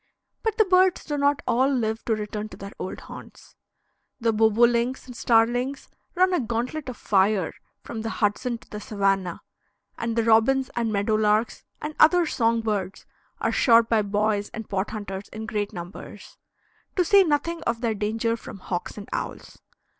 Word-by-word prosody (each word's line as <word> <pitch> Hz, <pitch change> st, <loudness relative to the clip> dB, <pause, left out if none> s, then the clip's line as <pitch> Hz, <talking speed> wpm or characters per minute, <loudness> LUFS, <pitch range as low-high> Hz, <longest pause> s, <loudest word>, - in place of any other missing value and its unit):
But 445 Hz, -2 st, -1 dB
the 435 Hz, -, +5 dB
birds 370 Hz, -1 st, +3 dB
do 295 Hz, -, -2 dB
not 285 Hz, 0 st, +1 dB
all 250 Hz, +2 st, +3 dB
live 225 Hz, -5 st, -1 dB
to 225 Hz, -, +1 dB
return 210 Hz, 0 st, -5 dB
to -, -, -11 dB
their 200 Hz, 0 st, -8 dB
old 185 Hz, -, -5 dB
haunts: -, -, -12 dB, 0.6 s
the 230 Hz, -2 st, +1 dB
bobolinks 235 Hz, +3 st, +3 dB
and 250 Hz, -2 st, -10 dB
starlings 245 Hz, +4 st, +1 dB, 0.3 s
run 370 Hz, +1 st, +3 dB
a 360 Hz, -, +2 dB
gauntlet 250 Hz, +5 st, -3 dB
of 250 Hz, -, -7 dB
fire 195 Hz, -2 st, +2 dB, 0.3 s
from 225 Hz, -, -6 dB
the 225 Hz, -, -3 dB
Hudson 230 Hz, +3 st, -1 dB
to -, -, -21 dB
the 210 Hz, -, -5 dB
Savannah, 195 Hz, -4 st, -1 dB, 0.6 s
and 230 Hz, -1 st, -2 dB
the 230 Hz, -, +2 dB
robins 235 Hz, +4 st, +3 dB
and 230 Hz, -2 st, 0 dB
meadow 205 Hz, +1 st, 0 dB
larks 215 Hz, +1 st, +1 dB, 0.2 s
and 300 Hz, +1 st, -3 dB
other 345 Hz, +2 st, +6 dB
song 230 Hz, -6 st, +1 dB
birds 200 Hz, -4 st, -3 dB, 0.3 s
are -, -, 0 dB
shot 230 Hz, -2 st, +5 dB
by 225 Hz, -2 st, +3 dB
boys 205 Hz, 0 st, 0 dB
and 225 Hz, -2 st, -6 dB
pot 195 Hz, +1 st, -2 dB
hunters 205 Hz, -2 st, -6 dB
in 220 Hz, +1 st, -6 dB
great 210 Hz, -2 st, -2 dB
numbers, 180 Hz, +4 st, -10 dB, 0.6 s
to 365 Hz, -3 st, +2 dB
say 395 Hz, +3 st, +6 dB
nothing 330 Hz, +1 st, -1 dB
of 230 Hz, 0 st, -1 dB
their 230 Hz, -2 st, +1 dB
danger 220 Hz, +2 st, -1 dB
from 220 Hz, -, -10 dB
hawks 180 Hz, 0 st, -5 dB
and 205 Hz, -, -8 dB
owls. -, -, -5 dB
225 Hz, 175 wpm, -25 LUFS, 210-255 Hz, 0.6 s, other